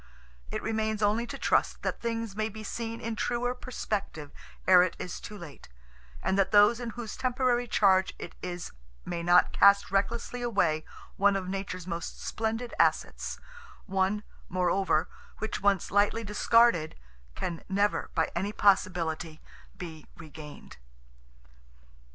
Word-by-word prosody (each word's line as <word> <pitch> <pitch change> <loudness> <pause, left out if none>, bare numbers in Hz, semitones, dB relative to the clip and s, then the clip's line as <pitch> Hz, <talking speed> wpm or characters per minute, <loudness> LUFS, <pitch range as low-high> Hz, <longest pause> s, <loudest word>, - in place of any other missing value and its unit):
It - - -4
remains 220 -1 -1
only 220 +3 +2
to - - -6
trust - - +1
that - - -2
things 230 -3 -3
may 215 +1 -1
be 220 +1 -9
seen 230 +1 -4
in 230 0 -4
truer 245 +2 -1
perspective 205 - -4 0.4
ere 185 -1 +8
it 180 -1 +1
is 180 - -6
too 210 - -9
late, 165 - -11 0.5
and 195 - +1
that 195 -1 +3
those 210 +3 +6
in 240 -1 -4
whose 230 -3 -5
temporary 250 -1 +1
charge 190 -4 +4
it - - -8
is 175 -1 -5 0.3
may 170 -1 -3
not 175 +1 +4
cast 200 -1 +5
recklessly 230 +5 -1
away 180 -10 +1 0.3
one 200 0 +4
of 190 -2 -2
nature's 190 -2 -4
most 170 -2 -5
splendid 225 +2 -3
assets, - - +1 0.5
one, 195 +1 0 0.3
moreover, 180 -2 +1 0.3
which 220 0 -4
once 200 -2 +2
lightly 205 +3 +2
discarded, 210 -5 +3 0.4
can 170 -2 -4
never 200 +2 +1
by 165 - +1
any 195 +4 -1
possibility, 175 -6 +1 0.4
be 160 -3 -8
regained. 155 -2 -11
200 Hz, 140 wpm, -29 LUFS, 180-225 Hz, 0.5 s, ere